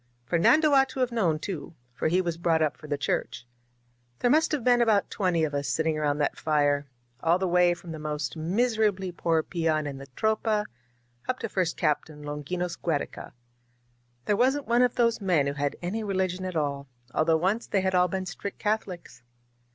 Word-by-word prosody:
Fernando 300 Hz, -, +4 dB
ought 270 Hz, -1 st, +5 dB
to 260 Hz, -, -7 dB
have 250 Hz, -1 st, +1 dB
known, 185 Hz, -10 st, +1 dB
too, 165 Hz, -2 st, -6 dB, 0.2 s
for 125 Hz, -, -1 dB
he 180 Hz, +4 st, +2 dB
was 170 Hz, -2 st, -2 dB
brought 165 Hz, -2 st, +2 dB
up 155 Hz, -, 0 dB
for 155 Hz, -, -12 dB
the 145 Hz, -1 st, -1 dB
Church. 140 Hz, -, -2 dB, 0.7 s
There 245 Hz, -, +2 dB
must 315 Hz, +2 st, +3 dB
have 295 Hz, -6 st, -1 dB
been 245 Hz, 0 st, +4 dB
about 220 Hz, -4 st, +2 dB
twenty 180 Hz, -5 st, +1 dB
of 150 Hz, -2 st, -1 dB
us 140 Hz, 0 st, -2 dB
sitting 160 Hz, +4 st, 0 dB
around 150 Hz, -1 st, 0 dB
that 150 Hz, -, -1 dB
fire, 145 Hz, -2 st, +1 dB, 0.3 s
all 165 Hz, +4 st, +3 dB
the 190 Hz, 0 st, -1 dB
way 175 Hz, 0 st, +4 dB
from 175 Hz, -1 st, -10 dB
the 160 Hz, -, -6 dB
most 150 Hz, 0 st, -3 dB
mis 215 Hz, +9 st, 0 dB
erably 190 Hz, -4 st, 0 dB
poor 165 Hz, -2 st, +1 dB
peon 160 Hz, -3 st, 0 dB
in 140 Hz, -2 st, -5 dB
the 135 Hz, -, -10 dB
Tropa 220 Hz, -1 st, +1 dB, 0.6 s
up 255 Hz, -, 0 dB
to -, -, -4 dB
First 185 Hz, -5 st, -1 dB
Captain 150 Hz, -1 st, -1 dB
Longinos 170 Hz, +4 st, -4 dB
Giiereca. 160 Hz, -4 st, -3 dB, 0.9 s
There 205 Hz, -, +2 dB
wasn't 265 Hz, +5 st, +2 dB
one 235 Hz, +1 st, +3 dB
of 250 Hz, -1 st, +2 dB
these 230 Hz, -2 st, +2 dB
men 175 Hz, -7 st, +2 dB
who 140 Hz, -, -1 dB
had 145 Hz, 0 st, -2 dB
any 215 Hz, +6 st, -2 dB
religion 185 Hz, -2 st, -1 dB
at 185 Hz, -2 st, -4 dB
all, 140 Hz, -2 st, -2 dB, 0.3 s
although 160 Hz, +1 st, +3 dB
once 195 Hz, +8 st, 0 dB
they 195 Hz, -, +1 dB
had 190 Hz, 0 st, 0 dB
all 180 Hz, 0 st, +4 dB
been 190 Hz, +1 st, -3 dB
strict 190 Hz, +2 st, -6 dB
Catholics. 205 Hz, -, -3 dB
175 Hz, 200 wpm, -27 LUFS, 155-210 Hz, 0.9 s, ought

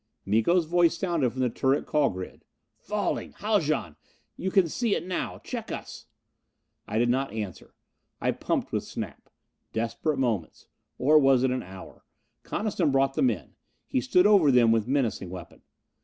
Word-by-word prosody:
Miko's 115 Hz, -, +3 dB
voice 170 Hz, +1 st, +3 dB
sounded 170 Hz, -9 st, 0 dB
from 130 Hz, +3 st, -5 dB
the 125 Hz, -, +2 dB
turret 135 Hz, +4 st, +1 dB
call 150 Hz, -2 st, +2 dB
grid: 95 Hz, 0 st, -8 dB, 0.4 s
"Falling! 210 Hz, -2 st, -2 dB
Haljan, 155 Hz, -, 0 dB, 0.4 s
you 190 Hz, -, -3 dB
can 190 Hz, -3 st, +4 dB
see 225 Hz, +5 st, 0 dB
it -, -, -4 dB
now! 185 Hz, -1 st, -3 dB
Check -, -, -6 dB
us!" -, -, -7 dB, 0.8 s
I 105 Hz, -, -2 dB
did 120 Hz, +1 st, +3 dB
not 130 Hz, +3 st, 0 dB
answer 105 Hz, -5 st, -7 dB, 0.4 s
that. -, -, -7 dB
I -, -, +4 dB
pumped -, -, -2 dB
with -, -, -1 dB
Snap. -, -, -7 dB, 0.4 s
Desperate 115 Hz, +6 st, -1 dB
moments. 115 Hz, -11 st, -2 dB, 0.3 s
Or 150 Hz, +4 st, +5 dB
was 135 Hz, -3 st, +4 dB
it 130 Hz, -, +2 dB
an 130 Hz, -, -1 dB
hour? 95 Hz, +1 st, -12 dB, 0.4 s
Coniston 195 Hz, -7 st, -1 dB
brought 135 Hz, 0 st, +2 dB
the -, -, -1 dB
men. 260 Hz, -, 0 dB, 0.3 s
He 260 Hz, -, 0 dB
stood 180 Hz, -8 st, +3 dB
over 200 Hz, -8 st, +6 dB
them 120 Hz, -3 st, +5 dB
with 115 Hz, -1 st, +1 dB
menacing 125 Hz, -8 st, 0 dB
weapon. 90 Hz, -2 st, -10 dB
135 Hz, 165 wpm, -27 LUFS, 115-175 Hz, 0.8 s, over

